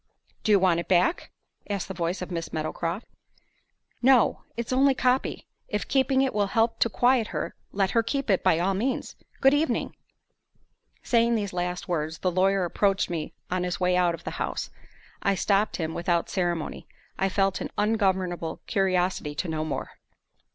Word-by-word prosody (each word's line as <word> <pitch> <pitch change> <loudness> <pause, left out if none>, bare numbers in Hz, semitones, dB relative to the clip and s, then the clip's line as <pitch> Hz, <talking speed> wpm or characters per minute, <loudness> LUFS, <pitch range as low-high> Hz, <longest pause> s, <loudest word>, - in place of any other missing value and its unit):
"Do 215 - +2
you 205 - +7
want 180 -3 +3
it 170 - -5
back?" 185 - +2 0.4
asked 200 -2 -2
the 190 - -5
voice 175 +1 -2
of 180 - -8
Miss 165 -2 -4
Meadowcroft. 165 +5 -3 1.0
"No; 250 -2 +4 0.2
it's 235 +1 -2
only 270 +1 +5
a - - -16
copy. 255 +1 0 0.2
If 210 - -3
keeping 265 0 +3
it 265 - 0
will 205 -1 +1
help 225 +3 +1
to 230 - +3
quiet 245 0 +3
her, - - -4 0.2
let 195 -1 +1
her 230 - +3
keep 275 +4 -2
it 190 - +2
by 160 - +4
all 185 +3 +1
means. 245 +7 -2 0.3
Good 270 +1 +6
evening." 300 +2 0 1.1
Saying 235 0 +3
these 205 -4 -2
last 180 0 -3
words, 160 -2 -2
the 185 - 0
lawyer 190 +1 +2
approached 195 +1 +1
me 160 -3 -4 0.2
on 185 0 0
his 180 -1 -2
way 180 0 +2
out 175 -2 +2
of 170 - -15
the - - -4
house. - - -3 0.5
I 200 - +2
stopped 200 +2 +1
him 160 -2 -3
without 170 0 0
ceremony; 175 -4 -2 0.3
I 195 - +2
felt 195 0 +1
an - - -3
ungovernable 190 -6 0
curiosity 185 -6 0
to 175 - -2
know 155 -1 -2
more. 155 - -4
190 Hz, 180 wpm, -26 LUFS, 175-225 Hz, 1.1 s, you